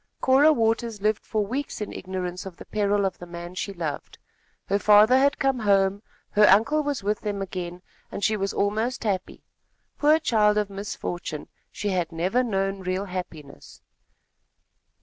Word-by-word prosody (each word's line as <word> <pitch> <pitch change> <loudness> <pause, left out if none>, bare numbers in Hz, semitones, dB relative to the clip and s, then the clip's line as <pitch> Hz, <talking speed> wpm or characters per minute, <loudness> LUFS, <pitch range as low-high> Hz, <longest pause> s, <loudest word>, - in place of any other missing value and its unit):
Cora 275 +4 +5
Waters 225 -3 0
lived 210 +1 0
for 215 -2 -1
weeks 270 +7 -4
in 210 - -5
ignorance 185 0 -5
of 180 - -10
the - - -11
peril 205 -1 +1
of 190 - -3
the 175 - -9
man 175 +1 -8
she 190 +2 -4
loved. 165 -6 -5 0.5
Her 200 +1 0
father 210 +4 +6
had 280 +2 +3
come 270 -2 +1
home, 200 -2 +2 0.3
her 210 0 +5
uncle 250 +11 +4
was 290 -6 -3
with 210 +1 0
them 205 -2 -3
again, 180 -2 -5 0.3
and 200 - -6
she 215 - +2
was 195 -1 -2
almost 220 +6 -1
happy. 195 -4 -3 0.6
Poor 305 +1 +5
child 215 -9 +2
of 210 -1 0
misfortune, 175 -5 -5 0.2
she 205 - -3
had 180 -3 -1
never 185 +10 0
known 195 -3 -1
real 185 +1 -2
happiness. 170 -6 -8
200 Hz, 165 wpm, -25 LUFS, 185-225 Hz, 0.6 s, father